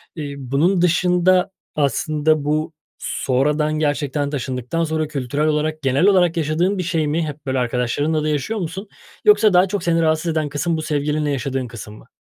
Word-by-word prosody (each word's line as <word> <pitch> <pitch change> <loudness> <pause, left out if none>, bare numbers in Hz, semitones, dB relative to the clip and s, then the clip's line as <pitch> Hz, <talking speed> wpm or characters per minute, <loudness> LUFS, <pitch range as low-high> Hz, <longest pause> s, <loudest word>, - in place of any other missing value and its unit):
eee, 145 -3 -5
bunun 145 +8 +1
dışında 180 +1 +3 0.2
aslında 150 +2 +1
bu 155 +2 -1 0.3
sonradan 150 +4 0
gerçekten 145 -1 -1
taşındıktan 130 +3 -3
sonra 155 -1 -1
kültürel 145 +1 -2
olarak 155 0 -1
genel 135 +6 +2
olarak 180 -4 +3
yaşadığın 165 +6 0
bir 185 - -1
şey 165 -3 0
mi 160 +2 -1
hep 150 0 -8
böyle, 130 -1 -1
arkadaşlarınla 125 +6 0
da 155 - 0
yaşıyor 155 +9 -2
musun 190 +4 -5 0.4
yoksa 220 - +5
daha 180 +2 +5
çok 200 +1 -3
seni 165 -1 +2
rahatsız 160 +1 +1
eden 155 -2 -1
kısım, 160 +3 -1
bu, 155 - -3
sevgilinle 150 0 -1
yaşadığın 135 -1 -2
kısım 110 -2 -9
mı? - - -17
155 Hz, 170 wpm, -20 LUFS, 140-170 Hz, 0.4 s, yoksa